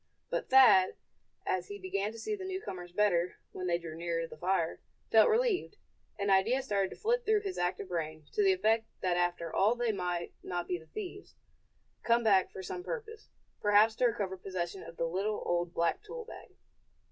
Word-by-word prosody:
But - - -2
Thad, 245 -8 +7 0.5
as 180 -1 -1
he 205 - -7
began 195 +2 -2
to 225 - -11
see 230 - -3
the 390 - -8
newcomers 200 - -5
better, 180 -3 +2 0.2
when 185 -1 -4
they 170 -1 +2
drew 165 -2 -8
nearer 165 0 -2
the - - -10
fire, 170 0 0 0.3
felt 220 -1 +7
relieved. 440 -3 +1 0.4
An 200 0 0
idea 225 +8 +3
started 200 -4 0
to - - -9
flit 475 +3 0
through 435 -2 +3
his 390 -2 -4
active 180 +2 -1
brain, 155 -3 -4
to 415 - +1
the 390 - +5
effect 225 - +2
that 180 -1 +1
after 175 -2 -1
all 210 +5 +4
they 240 -2 0
might 180 -3 -3
not 175 -1 -4
be 180 - -1
the 160 - -17
thieves, 400 -1 -8 0.7
come 235 0 +3
back 195 -4 +4
for 190 - -8
some 180 0 -5
purpose, 450 -2 -6 0.3
perhaps 210 +2 +5
to 250 - +4
recover 200 -5 -2
possession 185 -1 -4
of 165 - -11
the 165 - 0
little, 195 +5 -1
old, 175 0 0
black 170 -1 0
tool 460 +3 -8
bag. - - -11
195 Hz, 195 wpm, -31 LUFS, 175-245 Hz, 0.7 s, Thad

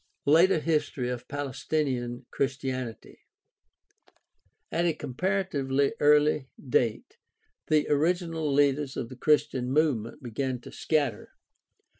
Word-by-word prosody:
Later 165 +6 +5
history 150 -5 -1
of 125 -1 -5
Palestinian 135 -3 -2
Christianity. 130 -3 -3 0.8
— - - -39
At 170 +1 +1
a 170 - +2
com 145 -4 -7
paratively 140 -6 0
early 150 -1 +4
date 120 -4 -1 0.5
the 155 -1 +2
original 165 0 0
leaders 140 0 +2
of 115 - -4
the 130 - -9
Christian 130 -3 +1
movement 135 -6 0
began 130 +2 -2
to - - -11
scatter. 145 -9 -1
140 Hz, 110 wpm, -28 LUFS, 130-155 Hz, 0.8 s, Later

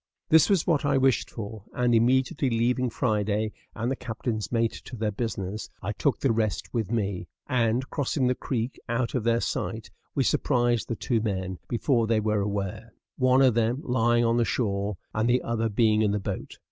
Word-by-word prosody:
This 160 +1 +6
was 195 -5 +3
what 160 -5 +2
I 140 - +2
wished 135 -1 +2
for, 110 -2 -7
and, 125 -1 +2
immediately 130 +4 +2
leaving 125 +2 +1
Friday 110 -2 0 0.2
and 115 +3 -1
the - - 0
captain's 110 -2 -4
mate 115 -1 +2
to 125 - -8
their 110 -2 -1
business, 105 -2 -4
I 100 - -1
took 135 +6 0
the 135 - +3
rest 110 -2 -1
with 115 -5 -1
me; 100 -6 -1 0.2
and, 125 -1 +1
crossing 140 -1 0
the 125 - +3
creek 125 -1 -3
out 120 0 0
of 125 - -1
their 115 0 +2
sight, 110 -4 -3 0.2
we 135 - +2
surprised 120 -2 +1
the 115 - -2
two 115 0 0
men 95 -4 -3
before 120 -1 +1
they 115 -1 +2
were 105 -1 +1
aware 100 +2 -4 0.2
one 130 +1 +5
of 130 -3 +5
them 115 +3 +1
lying 120 -3 +2
on 115 +1 +2
the 120 - +3
shore, 100 -4 -1 0.2
and 110 +2 +1
the 125 +1 +3
other 115 -1 -1
being 110 0 +3
in 105 -2 +2
the 105 - 0
boat. 95 - -5
115 Hz, 195 wpm, -27 LUFS, 110-125 Hz, 0.2 s, This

